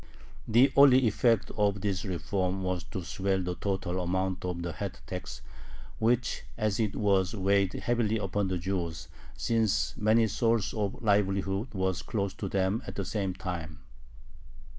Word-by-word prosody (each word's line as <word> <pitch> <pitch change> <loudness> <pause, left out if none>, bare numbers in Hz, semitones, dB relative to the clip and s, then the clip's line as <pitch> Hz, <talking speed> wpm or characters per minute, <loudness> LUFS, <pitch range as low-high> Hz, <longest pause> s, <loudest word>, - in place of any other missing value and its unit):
The 125 +5 +5
only 130 -2 +7
effect 115 0 +2
of 100 -2 +1
this 95 -1 -1
reform 95 0 -2
was 90 -2 -1
to 95 - -6
swell 95 +2 -1
the 90 0 -2
total 95 -1 -2
amount 95 +1 -1
of 90 -1 -3
the 85 - -3
head 100 -2 -5
tax, 95 +1 -6 0.6
which 120 +2 +1 0.2
as 110 -1 0
it 105 -3 0
was 100 -2 +2
weighed 100 -1 +2
heavily 115 -2 0
upon 100 -1 -1
the 95 -1 -1
Jews, 85 -3 -3 0.3
since 115 -3 +1
many 110 +2 +4
sources 115 0 +1
of 105 0 -3
livelihood 100 +1 +1
were 95 0 +1
closed 100 +2 -3
to 100 - -3
them 95 +4 0
at - - -6
the 100 - -3
same 95 -1 -2
time. 85 -5 -5
100 Hz, 155 wpm, -29 LUFS, 95-110 Hz, 0.6 s, only